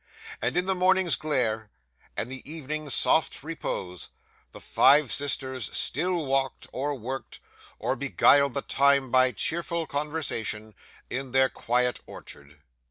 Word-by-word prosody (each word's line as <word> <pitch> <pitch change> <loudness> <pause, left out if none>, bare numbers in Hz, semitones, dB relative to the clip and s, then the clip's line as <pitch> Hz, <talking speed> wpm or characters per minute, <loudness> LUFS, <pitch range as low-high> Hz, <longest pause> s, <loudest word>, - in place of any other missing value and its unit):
And - - -1
in 180 - +1
the 190 - +2
morning's 185 -1 +3
glare, 110 -8 -1 0.5
and 120 - -2
the 130 - -5
evening's 155 -2 -2
soft 160 -3 +3
repose, 95 - -5 0.4
the - - -11
five 145 -1 +4
sisters 130 -3 0
still 175 +2 0
walked, 135 -1 -1
or 145 +3 -2
worked, 130 +2 -7 0.4
or - - -1
beguiled 140 +2 +3
the 140 - -1
time 140 -2 +2
by 130 0 +4
cheerful 170 +6 -1
conversation, 140 -8 -2 0.4
in 130 -1 -4
their 130 0 +4
quiet 125 +1 0
orchard. 70 +1 -10
135 Hz, 130 wpm, -26 LUFS, 125-155 Hz, 0.5 s, five